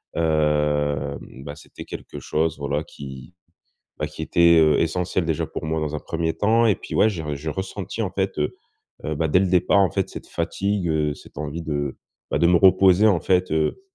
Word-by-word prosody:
hem, 75 -3 +1 0.2
bah, 70 0 -7
c'était - - -11
quelque - - -9
chose, 80 +1 -1
voilà, 70 -1 -2
qui, 65 +3 -10 0.6
bah, 75 - -2
qui 75 +1 -9
était, 85 +1 +4
heu, 75 -2 +4
essentiel, 90 +1 0
déjà 80 -2 -1
pour - - -6
moi 80 0 -1
dans 75 0 -3
un 75 - -2
1er 80 0 -2
temps 115 +3 +2
et 105 - +4
puis, - - -7
ouais, 110 - +5
j'ai 80 -6 -4
j'ai 80 +3 -5
ressenti, 95 +4 -5
en 100 -4 -2
fait, 95 -3 -2
heu 75 - -1 0.5
heu, 75 - -2
bah, 80 +1 -1
dès 90 - +4
le 95 - +2
départ, 90 +2 +3
en 95 -2 +4
fait, 95 -2 -1
cette - - -9
fatigue, 100 -2 -2
heu, 75 -2 0
cette - - -14
envie 75 +2 -4
de, 70 -3 -3 0.4
bah, - - +2
de 85 - +4
me 90 - +5
reposer, 95 +2 +5
en 95 -6 +3
fait, 90 -3 +1
heu, 80 - 0
80 Hz, 205 wpm, -23 LUFS, 75-95 Hz, 0.6 s, ouais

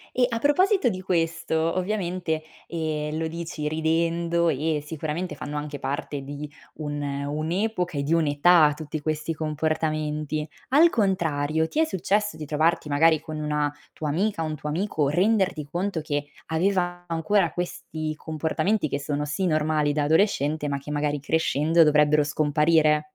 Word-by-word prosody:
E 250 -1 +4
a 230 -1 -2
proposito 365 - +3
di 185 -4 -3
questo, 165 -1 0
ovviamente, 180 -5 -2 0.2
ehm, 155 -2 -3
lo 160 0 -1
dici 165 -2 -4
ridendo 170 +2 +1
e 150 +1 0
sicuramente 160 +3 -4
fanno 150 0 -5
anche 150 -1 -4
parte 140 +1 -4
di 145 +2 -7 0.2
un 145 -1 -4
un'epoca 155 +6 -2
e - - 0
di 150 +4 -1
un'età 155 0 +5
tutti 155 0 -5
questi 155 +2 -2
comportamenti. 155 0 -1 0.2
Al 320 +5 +6
contrario, 160 - +1
ti 305 - -4
è 320 - +5
successo 205 - 0
di 155 - -6
trovarti 155 +1 +1
magari 155 +2 +4
con 155 -1 -7
una 150 -1 0 0.2
tua 155 - -4
amica, 175 +3 0
un 155 -1 -3
tuo 150 - -6
amico, 155 -3 0
renderti 190 0 +2
conto 180 -1 -1
che 145 -1 -2 0.2
aveva 175 +1 0
ancora 170 +3 +1
questi 155 -3 -4
comportamenti 160 +4 -1
che 140 - -2
sono 145 +1 -2
sì, 180 +6 -1
normali 155 -2 +1
da 145 0 0
adolescente, 155 -3 +2
ma 140 - -1
che 140 +2 -10
magari 145 -1 -1
crescendo 160 +2 +3
dovrebbero 150 0 +4
scomparire? 150 +1 +3
155 Hz, 150 wpm, -25 LUFS, 150-175 Hz, 0.2 s, Al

